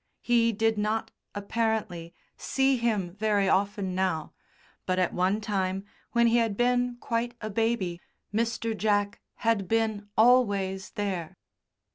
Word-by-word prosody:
He 235 -1 +3
did 225 0 +1
not, 215 +2 -1 0.2
apparently, 205 -5 -2 0.2
see 270 0 +1
him 210 -7 -1
very 205 -1 +1
often 195 0 +1
now, 180 -4 -1 0.5
but 185 0 +1
at 185 -2 +1
one 185 +4 +1
time 195 -2 -2 0.3
when 235 -1 +4
he 235 +1 +4
had 225 -4 +1
been 245 0 +1
quite 235 0 -2
a 215 -1 -5
baby 200 -6 -1 0.3
Mr. 230 0 -1
Jack 205 0 0 0.2
had 215 -5 +2
been 220 -2 0
always 200 -5 +3
there. 190 -4 -3
210 Hz, 130 wpm, -27 LUFS, 190-230 Hz, 0.5 s, when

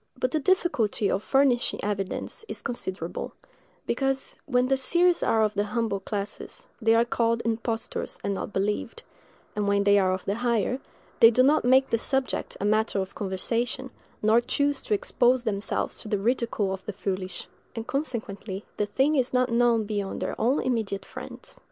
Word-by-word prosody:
But 255 0 0
the 310 - +1
difficulty 260 - +1
of 195 - 0
furnishing 270 -1 +2
evidence 200 - -3
is - - -6
considerable: 190 -8 -4 0.5
because, 270 -1 0
when 250 -2 +2
the 270 - +3
seers 345 +6 +4
are 220 -1 +3
of 210 -1 +1
the 205 0 0
humbler 215 -1 -1
classes, 200 +1 -5 0.2
they 225 0 +4
are 230 +1 +4
called 230 -1 0
impostors 225 0 -2
and 200 - 0
not 195 - -4
believed; 200 +2 -2 0.5
and 210 -1 0
when 200 0 +3
they 200 0 +5
are 185 -1 +2
of 185 0 -3
the 200 - 0
higher, 235 +1 0 0.4
they 230 - +9
do 245 +2 +4
not 280 -1 +3
make 260 +2 +4
the 230 - +2
subject 265 +2 -1
a 200 - -2
matter 215 0 +2
of 190 0 -4
conversation, 230 +6 -2 0.3
nor 220 +2 +5
choose 285 +3 0
to 210 - +2
expose 245 +4 +2
themselves 205 -3 -2
to - - -8
the 210 - 0
ridicule 225 -2 0
of 190 -1 -6
the 210 - -3
foolish; 185 -2 -4 0.3
and 225 -1 -4
consequently 220 -8 -4
the 210 - 0
thing 270 +8 +2
is 260 -3 +1
not 250 -1 +2
known 235 -1 +3
beyond 205 -2 -3
their - - -2
own 250 +6 +2
immediate 220 -6 -1
friends. - - -9
225 Hz, 175 wpm, -26 LUFS, 200-255 Hz, 0.5 s, they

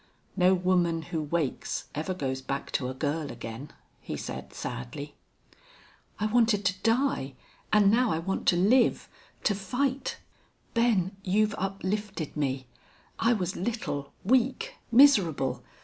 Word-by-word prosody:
"No 185 0 +5
woman 175 -2 +1
who 165 -2 -3
wakes 150 -2 -2
ever 160 +5 -2
goes 130 -5 -2
back 135 +1 -4
to 125 -2 -1
a 130 - -5
girl 145 +1 -2
again," 115 +4 -7 0.3
he - - -6
said, - - -6
sadly. - - -6 1.1
"I 210 - 0
wanted 220 -2 +3
to 185 0 0
die 225 - +1 0.4
and 205 -2 +5
now 245 +2 +3
I 160 - +1
want 190 +4 -3
to - - +6
live 220 +8 +3 0.4
to 210 - +3
fight.... 255 +8 -1 0.6
Ben, 220 -5 +2
you've 210 +2 +2
uplifted 195 -2 -3
me. 135 -3 -1 0.5
I 230 +2 +4
was 185 -4 -2
little, 180 -9 -3
weak, 260 - +2 0.2
miserable.... 200 - +5
185 Hz, 135 wpm, -28 LUFS, 155-225 Hz, 1.1 s, to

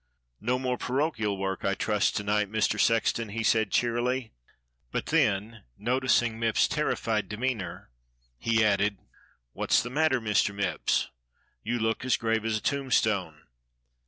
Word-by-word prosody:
"No 125 +3 0
more 125 -1 -2
parochial 125 -7 -1
work, 95 0 -3
I 100 0 +1
trust 105 0 +1
to 105 - -2
night, 105 0 0
Mr. 110 -1 +1
Sex 115 0 +3
ton.^" 115 -3 -5
he 115 0 -2
said 110 0 +2
cheerily, 120 +1 0 0.6
but - - -2
then 105 +3 +1 0.2
noticing 120 -2 +1
Mipps's 115 -1 +2
terri - - 0
fied 110 -2 -1
demeanour 105 - -4 0.5
he 110 -1 +2
added: 100 0 +2 0.6
"What's - - +2
the 120 - -6
matter, 150 -2 +2
Mr. 105 -2 +1
Mipps 95 -5 -3 0.2
.^ - - -11 0.5
You 120 - -2
look 110 +1 -1
as 130 - +2
grave 115 -1 0
as 110 -1 +1
a - - -6
tombstone." 110 - 0
110 Hz, 155 wpm, -28 LUFS, 105-120 Hz, 0.6 s, Sex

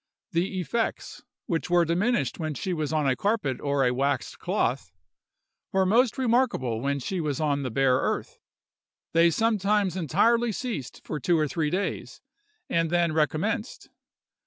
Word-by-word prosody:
The 185 +3 -1
effects, 225 +6 -3 0.2
which 165 0 -2
were 175 -1 +4
diminished 200 +10 0
when 155 -2 -3
she 185 +7 -2
was 155 -3 -2
on 155 -2 +1
a 130 - +2
carpet 195 - -1
or 140 -2 +1
a 125 - +2
waxed 135 -1 -1
cloth, - - -1 0.8
were 190 0 +2
most 235 +7 +3
remarkable 235 - +1
when 140 +1 0
she 175 +7 -3
was 145 -4 -2
on 145 -2 0
the 130 - -3
bare 130 +2 +3
earth. - - -2 0.7
They 165 +1 +5
sometimes 205 -1 +1
entirely 220 - +2
ceased 215 - -5
for 155 - -4
two 170 +4 +2
or 155 -1 +1
three 155 +1 -1
days, 190 +5 -3 0.5
and 165 -1 +1
then 170 -1 +2
recommenced. 160 - -1
170 Hz, 155 wpm, -26 LUFS, 145-205 Hz, 0.8 s, They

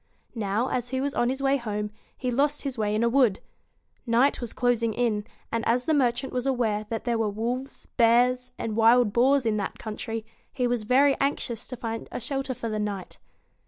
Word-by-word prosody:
Now, 220 +2 -1
as 245 -1 -2
he 260 0 -1
was 280 +1 -1
on 240 -3 +1
his 265 +1 -3
way 275 +1 +3
home, 210 -4 -3 0.3
he 255 -2 -2
lost 285 +4 +1
his 275 -3 -3
way 210 -2 0
in 220 - +1
a - - +4
wood. 235 -5 +3 0.7
Night 240 +5 +3
was 240 - -4
closing 235 -3 +1
in, 225 -3 0 0.2
and 230 0 -1
as 245 +2 +2
the 320 - +2
merchant 260 -2 +1
was 250 +1 -1
aware 220 -5 0
that 225 -1 -3
there 235 -2 0
were 220 -2 +1
wolves, 240 +6 -4
bears, 250 +2 +3
and 220 -2 -3
wild 230 -1 +5
boars 265 +2 +4
in 220 -1 +1
that 200 - -3
country, 225 0 -5 0.3
he 250 -2 -1
was 240 -3 0
very 275 +4 +4
anxious 250 -4 -1
to 250 - -7
find 230 -2 -5
a - - -4
shelter 270 +2 -3
for 230 - -5
the 215 -1 -2
night. 200 -3 -4
240 Hz, 205 wpm, -26 LUFS, 225-260 Hz, 0.7 s, wild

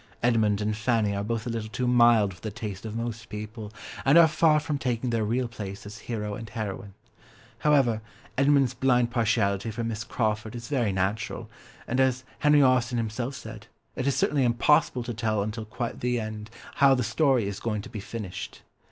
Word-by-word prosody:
Edmund 110 -4 +2
and 105 0 0
Fanny 110 -2 +1
are 100 - -2
both 115 +1 -2
a - - -3
little 110 -1 -4
too 125 +3 -2
mild 120 -5 +5
for 90 - -17
the 110 - -3
taste 105 -2 -6
of 110 - -6
most 115 -1 -4
people, 105 +1 -7 0.3
and 140 +4 +5
are 170 -1 +9
far 155 -1 +4
from 150 -1 -3
taking 125 -1 -1
their 115 -1 +1
real 120 +4 0
place 100 -5 -7
as 105 +1 -9
hero 105 -3 -4
and 110 +1 -7
heroine. 100 -2 -5 0.6
However, 135 -7 +3 0.3
Edmund's 140 -1 +3
blind 125 -2 +2
partiality 110 -3 +1
for 115 +2 -4
Miss 115 0 -3
Crawford 110 -2 -2
is 120 0 -7
very 120 -8 +1
natural, 95 +3 -2 0.4
and, 125 - -1
as 130 -1 +2 0.2
Henry 150 -1 +5
Austen 130 -1 +3
himself 115 +4 -2
said, 110 -3 -9 0.3
it 130 - -2
is 140 - +2
certainly 145 -3 +2
impossible 125 +2 +3
to 120 0 -4
tell 110 -2 0
until 110 +1 -4
quite 115 +2 -4
the 125 0 0
end 110 -1 -6 0.3
how 140 -1 +6
the 125 - 0
story 125 -1 +2
is 100 0 -4
going 105 -3 -2
to - - -9
be 110 - -6
finished. 100 -2 -7
115 Hz, 195 wpm, -27 LUFS, 105-125 Hz, 0.6 s, are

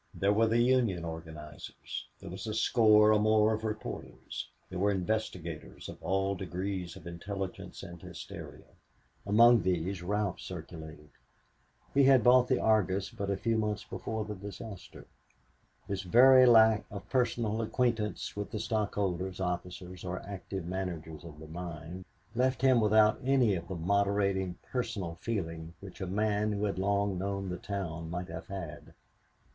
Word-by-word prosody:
There 100 +1 +2
were 115 +2 +4
the 115 +1 +2
Union 120 -8 +2
organizers; 80 -2 -8
there - - -9
was 95 +5 -6
a 105 - -2
score 110 -2 +5
or 105 - +4
more 110 0 +4
of 110 0 -3
reporters; 110 -1 -5 0.2
there 90 - -5
were 100 +2 +3
investigators 90 -5 -3
of - - -9
all 95 +4 0
degrees 95 -1 -4
of - - -12
intelligence 95 +2 -6
and 85 -1 -9
hysteria. - - -9 0.6
Among 115 +3 +7
these 90 +1 -1
Ralph 100 +1 -1
circulated. 80 -2 -9 0.8
He 140 -1 +5
had 130 -3 +6
bought 125 +1 +6
the 130 - +2
Argus 100 -2 +2
but 100 -4 -4
a 100 - 0
few 115 +2 0
months 105 -1 -1
before 110 -1 -4
the 105 - -5
disaster. 100 0 -9 0.8
His 100 -1 -2
very 130 +7 +7
lack 110 -2 +6
of 100 -1 -8
personal 115 -3 0
acquaintance 115 -2 -1
with 105 0 -4
the 105 - -4
stockholders, 100 -4 -1
officers 90 0 -4
or 90 0 -3
active 95 -2 -5
managers 85 -4 -5
of 80 -3 -10
the 80 0 -10
mine 85 +2 -7 0.3
left 130 +2 +1
him 130 -3 +5
without 110 +1 +5
any 130 -5 +3
of 85 -2 -4
the 95 - -4
moderating 100 0 +1
personal 95 -9 -3
feeling 85 -7 -4
which 100 -1 -11
a 95 - -2
man 105 +2 +1
who 105 +1 -1
had 100 -2 -2
long 100 -1 +1
known 100 0 -2
the 90 - -3
town 85 -5 -4
might 90 +1 -4
have 80 0 -7
had. 90 -6 -7
100 Hz, 155 wpm, -31 LUFS, 90-110 Hz, 0.8 s, Among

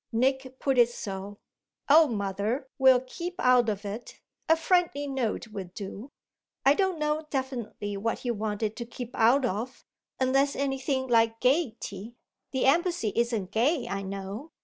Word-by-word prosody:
Nick 260 +2 0
put 270 -2 +1
it 240 -1 +6
so 200 -3 -6 0.5
'Oh 310 +2 +7
mother, 210 +4 -2
we'll 260 -2 +6
keep 340 +8 -6
out 250 -2 +4
of 205 0 -3
it; 210 +4 -7 0.3
a 325 - +7
friendly 325 -4 +1
note 255 -5 -2
will 195 -4 -6
do.' 205 +5 -7 0.6
I 275 - +7
don't 380 +1 0
know 300 0 -1
definitely 245 -7 -4
what 225 +3 -1
he 245 - +1
wanted 215 0 -2
to 235 - -4
keep 245 0 -8
out 245 +4 +4
of, 240 +4 -4 0.3
unless 270 +2 +2
anything 270 -1 -1
like 225 -2 +3
gaiety. 240 - -1 0.3
The 265 - 0
embassy 335 - +2
isn't 230 -5 0
gay, 250 +5 +1
I 195 - -3
know. 195 +8 -6
245 Hz, 150 wpm, -28 LUFS, 215-275 Hz, 0.6 s, Oh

